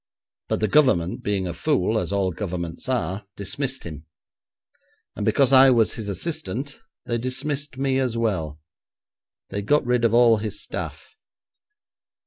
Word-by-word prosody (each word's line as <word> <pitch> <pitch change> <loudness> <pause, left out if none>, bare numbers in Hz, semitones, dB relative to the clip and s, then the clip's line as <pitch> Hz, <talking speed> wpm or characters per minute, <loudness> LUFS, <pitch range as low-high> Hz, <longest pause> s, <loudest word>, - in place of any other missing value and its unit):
But - - -1
the 110 - +2
Government 100 - +3
being 100 -2 -1
a 85 - -3
fool, 85 - +1
as - - -3
all 100 -2 +1
governments 85 +2 -5
are, 100 -5 -1
dismissed 130 +6 -1
him, 80 -2 -9 1.1
and - - -4
because 135 -1 +3
I 135 0 +8
was 115 -4 +3
his 110 -3 -5
assistant, 145 - -4 0.2
they 120 0 -1
dismissed 135 +3 -3
me 135 0 +1
as 125 -3 -1
well. 85 -10 -1 0.9
They 100 +1 -3
got 145 +7 +2
rid 125 -1 +1
of 115 - +4
all 115 -1 +5
his 105 -1 -4
staff. 440 - -6
115 Hz, 145 wpm, -23 LUFS, 95-130 Hz, 1.1 s, I